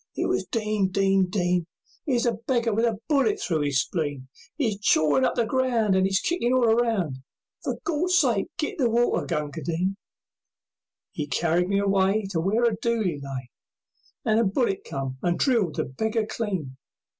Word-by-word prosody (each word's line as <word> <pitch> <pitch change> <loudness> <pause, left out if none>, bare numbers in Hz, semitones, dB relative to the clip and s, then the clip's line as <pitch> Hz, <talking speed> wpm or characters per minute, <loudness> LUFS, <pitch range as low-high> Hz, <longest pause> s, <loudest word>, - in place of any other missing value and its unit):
It - - -1
was - - 0
"Din! 215 -3 0
Din! 195 -1 +2
Din! 180 -3 0 0.4
'Ere's 250 -4 +1
a 240 - +3
beggar 235 -1 -1
with 225 +3 +2
a 225 -3 0
bullet 315 +9 +2
through 160 - -1
his 140 -2 +2
spleen 145 -4 -4 0.3
'E's 220 -9 -1
chawin 155 - +3
up - - +1
the 235 - +1
ground, 240 -4 +1
And 190 0 +3
'e's 195 0 +1
kickin' 255 -8 0
all 245 -3 +4
around, 220 - +1 0.5
For - - -2
Gawd's 350 +3 +1
sake 240 - +2
get 305 - -3
the 245 -4 +3
water, 240 +1 +1
Gunga 150 +1 -3
Din!" 175 +6 -1 1.2
'E 150 -2 -4
carried 170 +5 +1
me 200 - +2
away 200 +1 +2
To 170 - 0
where 200 +8 +1
a 235 -3 +3
dooli 205 -9 -1
lay, 135 -2 -6 0.7
And 220 0 +3
a - - +4
bullet 200 0 0
came 135 -1 -5
and 175 -1 0
drilled 225 - +1
the - - -1
beggar 220 - -1
clean. 185 - -4
200 Hz, 175 wpm, -25 LUFS, 170-235 Hz, 1.2 s, all